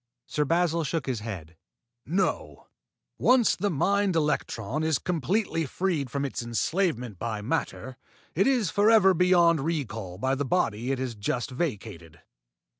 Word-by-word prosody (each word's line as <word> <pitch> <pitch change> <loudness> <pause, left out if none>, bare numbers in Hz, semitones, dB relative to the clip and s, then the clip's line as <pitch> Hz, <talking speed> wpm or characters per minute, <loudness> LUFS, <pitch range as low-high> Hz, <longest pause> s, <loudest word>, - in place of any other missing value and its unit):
Sir 150 - -1
Basil 170 +1 +1
shook 155 +1 -2
his 130 -4 -2
head. 90 -7 -7 0.5
"No. 185 +6 -1 0.5
When 255 0 +5
once 225 - +2
the 205 +3 -1
mind 200 +3 +1
electron 150 -4 -1
is 160 -2 +1
completely 170 - -1
freed 165 -5 -1
from 140 +3 -2
its 135 - -4
enslavement 120 - -1
by 110 -3 -3
matter, 125 +2 -3 0.4
it 195 - +2
is 245 -9 +2
forever 205 -2 +5
beyond 175 -2 +4
recall 120 - -3
by 130 +6 0
the 135 +1 -1
body 125 -6 0
it 135 - 0
has 130 -2 -3
just 120 +5 -3
vacated. 105 - -5
150 Hz, 145 wpm, -27 LUFS, 120-180 Hz, 0.5 s, When